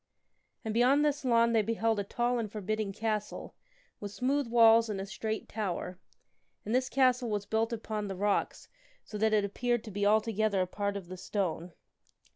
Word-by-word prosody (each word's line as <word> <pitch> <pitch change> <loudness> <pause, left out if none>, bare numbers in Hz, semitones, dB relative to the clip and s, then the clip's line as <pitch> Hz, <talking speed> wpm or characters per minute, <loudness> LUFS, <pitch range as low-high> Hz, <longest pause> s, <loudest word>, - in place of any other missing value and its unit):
And 220 - -2
beyond 260 +6 +4
this 295 0 0
lawn 235 -2 +3
they 225 - +4
beheld 225 0 0
a - - -1
tall 240 +4 -1
and 215 -3 -4
forbidding 215 0 -3
castle, 215 0 -3 0.5
with 205 - -5
smooth 265 +4 0
walls 230 -1 +5
and 200 -2 -3
a 195 - -4
straight 220 +1 -4
tower; 185 -3 -4 0.7
and 215 - -2
this 255 +1 +1
castle 255 -2 +2
was 205 -1 -2
built 225 +2 0
upon 215 -2 -4
the 195 - -5
rocks 205 +2 -1 0.4
so 210 - -7
that 220 +1 +2
it 210 -2 +3
appeared 240 +3 -1
to 220 - -9
be 205 +1 -3
altogether 215 -1 +2
a - - +1
part 200 +2 -3
of 190 -3 -9
the 185 +1 -8
stone. 180 -3 -3
220 Hz, 185 wpm, -30 LUFS, 205-235 Hz, 0.7 s, walls